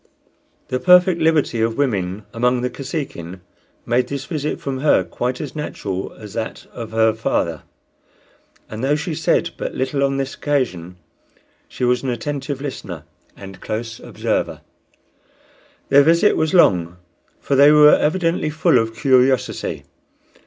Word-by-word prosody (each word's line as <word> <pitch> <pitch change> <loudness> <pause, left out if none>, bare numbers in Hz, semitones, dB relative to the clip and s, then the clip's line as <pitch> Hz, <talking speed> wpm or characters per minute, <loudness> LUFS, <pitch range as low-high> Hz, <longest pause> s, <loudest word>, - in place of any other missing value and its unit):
The 130 - -1
perfect 180 0 +5
liberty 155 -7 +2
of 115 0 0
women 100 -7 -1
among 125 +1 +1
the 125 0 -2
Kosekin 120 - -6 0.4
made 120 +2 +1
this 140 -1 -5
visit 150 0 -3
from 135 -2 -4
her 150 +2 +3
quite 125 +1 -3
as 150 -2 -6
natural 100 -10 -4
as 105 -2 -11
that 115 -1 -5
of 115 -2 -7
her 110 0 +2
father; 85 -7 -1 1.1
and 110 +2 -7
though 140 +2 +2
she 165 +2 -3
said - - 0
but - - -5
little 135 +2 -1
on 135 0 0
this 135 0 -3
occasion, 95 - -2 0.7
she - - -7
was 125 0 +2
an 135 - -3
attentive 140 +3 -4
listener 95 - -6 0.3
and 95 -1 -11
close 115 +1 -5
observer. - - -3 1.3
Their 140 - +7
visit 170 +7 +4
was 160 -1 0
long, 90 - +3 0.4
for 140 - -1
they 140 +2 +7
were 150 0 +7
evidently 165 0 +1
full 160 -3 +3
of 115 0 -2
curiosity. 130 -1 +1
130 Hz, 145 wpm, -20 LUFS, 110-150 Hz, 1.3 s, Their